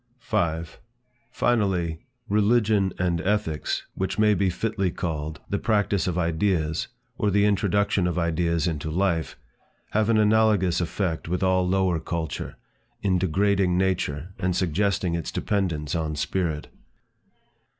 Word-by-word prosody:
5. 80 0 -2 0.5
Finally, 95 -10 0 0.3
religion 105 -2 +3
and 85 -2 0
ethics, 95 -6 -1
which 95 - -3
may 105 -1 +4
be 100 -2 +1
fitly 100 +1 -1
called, 80 -3 -4
the 100 - -1
practice 105 -3 +1
of 90 -1 -1
ideas, 85 -2 0 0.3
or 105 - +2
the 100 +1 +3
introduction 100 -2 +2
of 90 - -2
ideas 85 -1 +1
into 80 -2 -2
life, 85 -1 0 0.5
have 110 +1 +1
an 115 - +4
analogous 105 -4 +3
effect 85 -1 -2
with 90 +3 -1
all 95 -1 +2
lower 95 -2 +2
culture, 80 -1 -4 0.5
in 95 -3 +2
degrading 95 0 +2
nature 90 -3 -1
and 90 -1 0
suggesting 95 +1 0
its 85 -2 -3
dependence 85 -8 -1
on 80 -2 -1
spirit. 80 0 -2
90 Hz, 130 wpm, -25 LUFS, 85-100 Hz, 0.5 s, may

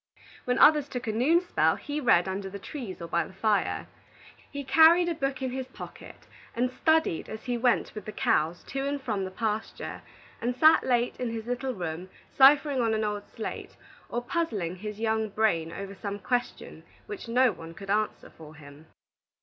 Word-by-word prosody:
When 250 0 +1
others 300 -2 +6
took 250 0 -5
a 220 - -1
noon 275 +11 +3
spell, 360 - +2
he 295 +1 -4
read 190 -9 +4
under 195 +1 -4
the 200 - -7
trees 200 - -7
or - - -5
by 170 - +1
the - - -12
fire. 210 0 0 0.7
He 285 -1 -5
carried 325 +5 +6
a 340 - 0
book 275 -3 -3
in 260 - -1
his 260 0 -4
pocket, 260 - -11 0.3
and 250 +2 0
studied 315 - +1
as 220 - -7
he 245 -1 -2
went 240 0 +1
with 215 -3 -8
the 215 - -5
cows 165 -3 0
to 270 +1 -2
and 285 0 -2
from 220 -7 -2
the - - -5
pasture, 215 +2 -4 0.4
and 245 +1 -1
sat 315 +4 +6
late 245 -1 +1
in 250 - -2
his 225 -1 -5
little 245 +1 -3
room, 175 0 -5 0.3
ciphering 280 0 +6
on 225 -1 +1
an 220 - -1
old 210 -1 -3
slate, 220 - -6 0.3
or 240 +1 -3
puzzling 220 - -2
his 210 +2 -7
young 220 -1 0
brain 175 -7 +1
over 195 +2 -7
some 200 0 -5
question 245 +4 -3 0.2
which 415 - -8
no 250 +1 +4
one 165 -2 -10
could 195 +2 -6
answer 215 +1 -1
for 155 -1 -13
him. 145 +1 -14
230 Hz, 190 wpm, -28 LUFS, 195-265 Hz, 0.7 s, others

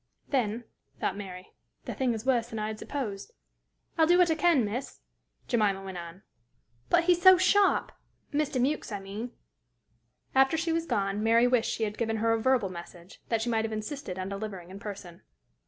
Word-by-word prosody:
"Then," 240 -4 0 0.4
thought 190 - -1
Mary, 185 -2 -9 0.3
"the - - -4
thing 250 -3 0
is 220 +2 -7
worse 245 -3 +2
than 225 - -7
I 215 0 -2
had 215 0 -6
supposed." 245 - -5 0.7
"I'll 320 - +6
do 350 +1 +5
what 355 -2 +5
I - - +5
can, 320 -6 +3
miss," 235 +6 -5 0.5
Jemima 205 -5 +1
went 190 -2 -6
on. 170 +3 -10 0.7
"But 340 - +4
he's 350 0 +3
so 375 0 +9
sharp! 385 +2 +3 0.4
Mr. 295 -2 0
Mewks, 275 0 0
I 205 - -3
mean." 205 +5 -6 1.0
After 270 +4 +4
she 330 +1 -1
was 330 0 -1
gone, 195 0 0
Mary 230 +2 +4
wished 245 -2 +2
she 225 - -2
had 210 -1 -3
given 225 -1 0
her 225 +1 +2
a 225 - 0
verbal 250 -5 +2
message; 175 0 -11
that 225 -1 +1
she 240 - -2
might 220 -1 +1
have 220 - -3
insisted 215 -1 -5
on 185 0 -3
delivering 195 -3 -6
in 195 - -9
person. 195 -5 -8
225 Hz, 190 wpm, -29 LUFS, 200-270 Hz, 1.0 s, so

